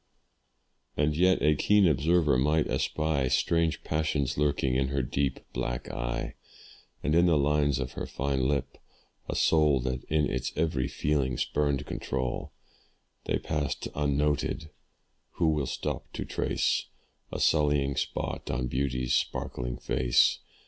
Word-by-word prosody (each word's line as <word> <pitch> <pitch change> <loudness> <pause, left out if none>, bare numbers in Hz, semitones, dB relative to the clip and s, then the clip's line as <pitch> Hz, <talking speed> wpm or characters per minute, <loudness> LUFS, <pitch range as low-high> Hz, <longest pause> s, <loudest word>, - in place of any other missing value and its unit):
And 75 +1 +2
yet 90 +3 +3
a 75 - +5
keen 105 +5 +4
observer 80 0 +3
might 75 +5 +2
espy 75 -4 0
Strange 85 +3 +1
passions 75 -4 -1
lurking 70 -3 +1
in 65 +1 +1
her 70 -2 -1
deep 70 +2 -1
black 60 +1 -3
eye, - - -3 0.7
And 75 - +1
in 85 +2 +5
the 80 -3 +4
lines 75 -1 +2
of 65 -1 -3
her - - -5
fine 65 -1 -1
lip, 70 0 -2 0.5
a - - -2
soul 75 -4 +4
That 65 0 -3
in 75 -1 +1
its 65 -1 -3
every 75 -4 0
feeling 70 -4 0
spurned 70 -2 0
control. 65 -1 -3 0.7
They - - +1
passed 75 -3 -3
unnoted 75 +1 0 0.6
who 85 -2 +2
will 75 -3 0
stop - - -4
to - - -4
trace - - 0 0.4
A - - -4
sullying 75 -3 +2
spot - - -3
on 65 0 -1
beauty's 65 0 -1
sparkling - - -2
face? 65 0 +2
70 Hz, 135 wpm, -28 LUFS, 65-75 Hz, 0.7 s, a